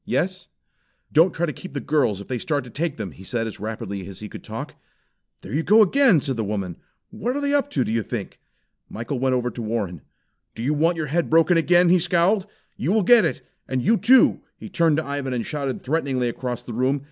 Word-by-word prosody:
"Yes!" 185 +1 -2 0.6
"Don't 165 +4 +5
try 170 - -1
to 155 - -4
keep 185 - -10
the - - -2
girls 125 -10 0
if - - -11
they 125 -2 -3
start 145 -1 -1
to 125 - -12
take 160 +2 -2
them," 105 -5 -5
he 95 - -14
said 115 +4 -2
as 110 - -7
rapidly 100 -3 -5
as 95 -2 -9
he 105 - -7
could - - -10
talk. - - -7 0.7
"There 100 - -9
they 150 - +1
go 215 +6 +6
again!" 220 - +4
said 135 -3 -2
the 110 - -1
woman 100 -4 -3 0.3
"What 220 +5 -3
are - - -1
they 285 0 0
up 285 -4 +1
to, 130 - 0
do 110 - -3
you 115 0 +1
think?" - - -6 0.5
Michael 120 +4 -4
went 130 0 +1
over 125 -1 -1
to 120 - -7
Warren. 105 -8 -3 0.5
"Do 115 - -5
you 145 +5 +1
want 165 +3 +2
your 155 - -2
head 165 +4 -1
broken 165 +2 +4
again?" 175 +1 +4
he 180 +1 +5
scowled. 185 +4 +2 0.3
"You 150 - -1
will 215 0 +3
get 230 0 +6
it. 160 - -2 0.2
And 130 -2 -2
you, 225 - +4
too!" 255 +3 +5 0.2
He - - -9
turned 165 -5 +2
to 160 - -1
Ivan, 140 -2 -3
and 115 - -2
shouted 140 -3 -4
threateningly 130 -4 0
across 125 0 -5
the 120 - -7
room. 130 +4 +1
145 Hz, 235 wpm, -23 LUFS, 120-175 Hz, 0.7 s, go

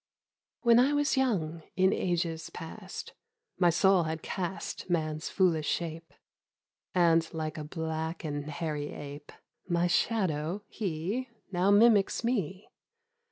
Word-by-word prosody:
WHEN 235 -1 +6
I 270 +4 +4
was 290 +1 +2
young, 180 -12 0
in 190 +1 +4
ages 170 -3 -1
past 185 +4 -8 0.5
My 175 -2 +5
soul 175 +1 +4
had 160 0 -3
cast 185 0 -4
Man's 155 -2 -1
foolish 165 -6 +2
shape, 165 -2 -3 0.8
And 165 -2 +4
like 155 -1 -3
a - - -4
black 160 +1 -4
and 145 -2 -3
hairy 150 -1 -3
ape 145 0 -8 0.2
— - - -43
My 170 - +3
shadow, 180 -2 0
he 200 +6 -3 0.2
Now 180 +1 +2
mimics 205 0 +5
me. 200 -5 -2
170 Hz, 125 wpm, -30 LUFS, 160-195 Hz, 0.8 s, WHEN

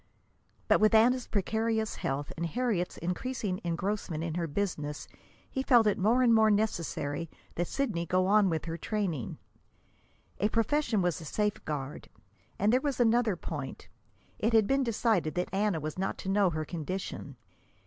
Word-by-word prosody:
But, - - +5
with 215 +1 +5
Anna's 245 +3 +4
precarious 220 +2 -1
health 140 +2 -3
and 170 0 -2
Harriet's 215 -3 -1
increasing 185 +2 -3
engrossment 175 -1 -2
in 165 -1 -3
her 170 0 -1
business, 150 -3 -3 0.4
he 265 - -3
felt 245 -4 +5
it 210 - +2
more 230 +6 +3
and 235 -2 +5
more 220 -1 +5
necessary 170 -7 -1 0.2
that 175 0 -2
Sidney 210 -12 -1
go 185 +2 +2
on 200 0 +4
with 160 -3 -2
her 165 0 -4
training. 185 - -2 1.0
A 210 - +2
profession 230 -2 +1
was 175 -2 0
a - - -8
safeguard. 150 -7 -3 0.5
And 210 +4 +2
there 255 - +4
was 280 -3 -2
another 235 -3 +3
point: 150 -5 -6 0.5
it 225 +2 +1
had 220 -2 +6
been 270 +5 +2
decided 220 -8 +1
that 180 +1 -2
Anna 200 -3 +1
was 155 +3 -5
not 190 - -1
to 190 - -5
know 195 -1 +4
her 155 -2 -3
condition. 175 +4 -5
195 Hz, 160 wpm, -30 LUFS, 165-225 Hz, 1.0 s, had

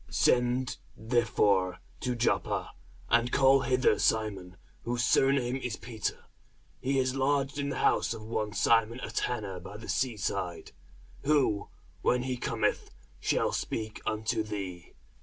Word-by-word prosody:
Send 125 +1 +2 0.2
therefore 105 -5 +2 0.2
to 125 -1 -1
Joppa, 120 0 0 0.4
and 120 +1 +3
call 135 0 +5
hither 130 -1 +2
Simon, 100 -5 0 0.2
whose 120 0 -1
surname 130 0 +3
is 125 -4 -3
Peter; 110 -4 -4 0.6
he 135 +1 0
is 130 -1 +1
lodged 140 +1 0
in 140 0 -1
the 140 - -3
house - - +2
of 110 - -9
one 110 -1 -2
Simon 115 +1 +3
a - - -5
tanner 105 -7 -2
by 95 +3 -9
the 115 - -10
sea 125 -4 0
side: 90 -5 -3 0.5
who, 135 -9 +2 0.3
when 125 0 +2
he 130 -1 -2
cometh, 120 - -1 0.3
shall - - +1
speak 110 -1 -3
unto 110 0 -1
thee. 100 -5 -6
115 Hz, 140 wpm, -30 LUFS, 105-130 Hz, 0.6 s, call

